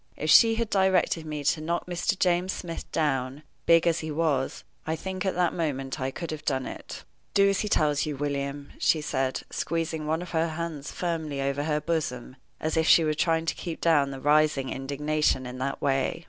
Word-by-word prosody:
If 155 0 0
she 225 -1 +7
had 230 -1 -2
directed 190 -4 +2
me 150 -1 -4
to 155 +3 +1
knock 170 +2 -2
Mr. 180 +2 -1
James 180 0 +1
Smith 165 -2 -7
down, 135 -2 -1 0.2
big 165 0 +6
as 170 -1 +2
he 160 - -5
was, 150 -4 -1 0.2
I 160 - 0
think 190 +3 -4
at 190 - 0
that 175 -1 +1
moment 135 -5 -2
I 130 - 0
could 165 +4 -6
have 155 -2 -6
done 130 -2 -1
it. - - -8 0.3
"Do 200 0 +6
as 195 0 +2
he 210 - -1
tells 150 -4 +2
you, 150 -2 -3
William," 140 0 -3
she 160 - +3
said, 135 -3 -2
squeezing 160 -2 -2
one 160 +3 0
of 180 - -10
her 165 -1 +1
hands 160 -3 -5
firmly 160 -5 -3
over 140 +1 -1
her 150 -1 +1
bosom, 145 -5 -3 0.2
as 155 +1 -1
if 160 0 +2
she 165 - +7
was 155 -1 0
trying 165 0 +1
to 160 - 0
keep 170 -2 -6
down 150 -5 +3
the 135 -1 -6
rising 145 -1 +3
indignation 145 0 0
in 125 +1 -7
that 135 +1 -3
way. 135 +1 +1
155 Hz, 205 wpm, -27 LUFS, 140-170 Hz, 0.3 s, she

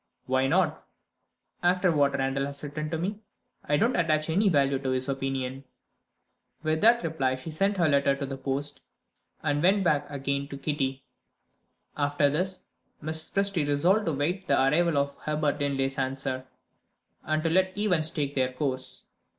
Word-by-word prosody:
"Why 130 +1 +2
not?" 160 0 +1 0.8
"After 180 0 +3
what 145 -3 +3
Randal 135 +1 0
has 140 0 -8
written 150 +1 -4
to 165 - -2
me, 195 +6 -3 0.4
I 145 - +1
don't 235 - +2
attach 155 -2 +1
any 200 +5 +3
value 140 -4 +2
to 135 -1 -3
his 130 0 -1
opinion." 135 -1 -3 1.0
With 155 0 0
that 235 0 +5
reply 140 -6 0
she 130 +5 -8
sent 195 +6 +1
her 170 -3 +3
letter 140 -1 +3
to 140 0 -4
the 135 0 -5
post, 140 +2 -2 0.6
and 145 -1 +1
went 195 +3 +4
back 150 -4 +1
again 140 0 -2
to 140 - -7
Kitty. 135 -2 -2 0.9
After 145 0 +2
this, 185 +5 -2 0.4
Mrs. 160 +1 -4
Presty 195 -6 +1
resolved 175 +9 +2
to 165 - +1
wait 175 +7 -2
the - - +3
arrival 155 +4 +3
of 140 0 0
Herbert 150 -1 -1
Linley's 135 -1 -1
answer, 130 -1 -2 0.8
and 155 +1 0
to 165 - +1
let 185 +2 +2
events 180 -7 +2
take 145 -3 -2
their 130 -2 +1
course. 130 -1 -3
145 Hz, 165 wpm, -27 LUFS, 135-165 Hz, 1.0 s, that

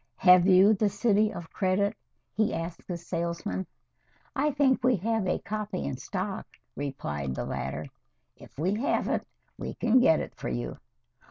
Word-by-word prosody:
"Have 180 -1 +6
you 190 +3 +7
'The 210 0 +2
City 210 +1 +2
of 165 -1 -8
Credit'?" 200 +1 +1 0.4
he 215 0 +1
asked 165 +1 -5
the 175 - -3
salesman. 170 +2 -3 0.7
"I 290 +2 +2
think 270 -3 +2
we 255 0 +4
have 220 +1 -1
a 180 - +1
copy 210 - -4
in 70 - -3
stock," - - -4 0.3
replied 75 - -3
the - - -3
latter. 65 +3 -4 0.5
"If - - -16
we 175 +7 +1
haven't, 230 +7 0 0.3
we - - -5
can 235 +2 +4
get 160 -10 +5
it - - -5
for - - -5
you." - - -4
185 Hz, 160 wpm, -28 LUFS, 160-215 Hz, 0.7 s, you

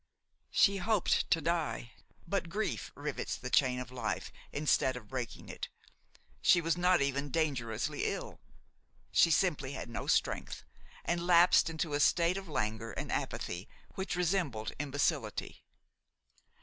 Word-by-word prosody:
She 200 0 +4
hoped 205 0 +1
to 165 - +3
die; 160 -7 -1 0.4
but 180 -1 -1
grief 210 +5 -2
rivets 145 0 -3
the 125 0 -6
chain 130 -2 +3
of 125 0 -6
life 125 -1 -3 0.2
instead 145 -3 +2
of 110 -4 -11
breaking 130 -3 -5
it. - - -6 0.7
She 175 - +6
was 165 0 +1
not 175 -3 +3
even 140 +1 -1
dangerously 130 -8 -1
ill; - - -4 0.7
she - - +5
simply 150 -5 +1
had - - -6
no - - -4
strength, - - 0 0.4
and 170 0 -1
lapsed 175 -1 +6
into 160 -1 -3
a 145 - +1
state 170 +4 +3
of 195 -1 -6
languor 110 -5 -2
and - - -4
apathy 90 +2 -3 0.2
which 190 -1 -3
resembled 170 - 0
imbecility. 145 -4 -1
150 Hz, 135 wpm, -32 LUFS, 130-175 Hz, 0.7 s, She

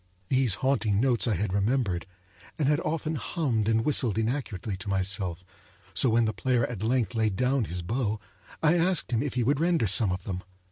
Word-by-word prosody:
Those 130 -7 +3
haunting 110 -4 +1
notes 125 -1 +2
I 110 - +1
had 95 +1 -2
remembered, 100 -3 0 0.5
and 150 - +1
had 150 +1 +3
often 160 -1 -2
hummed 120 - -1
and 115 +1 +1
whistled 125 -8 +2
inaccurately 110 -4 -2
to 100 +2 -7
myself, 95 -2 -1 0.5
so 130 - +4
when 115 +1 +3
the 110 - -1
player 125 -3 +1
at 115 -6 -6
length 115 -3 0
laid 110 -3 0
down 125 +2 +1
his 90 -1 -5
bow 110 +2 -1 0.4
I 155 +1 +5
asked 175 -4 +1
him 115 - +1
if 140 -2 -3
he 125 - +1
would 140 +4 +1
render 170 -5 +2
some 100 0 +4
of 90 0 -4
them. 95 -2 -4
115 Hz, 195 wpm, -27 LUFS, 100-135 Hz, 0.5 s, I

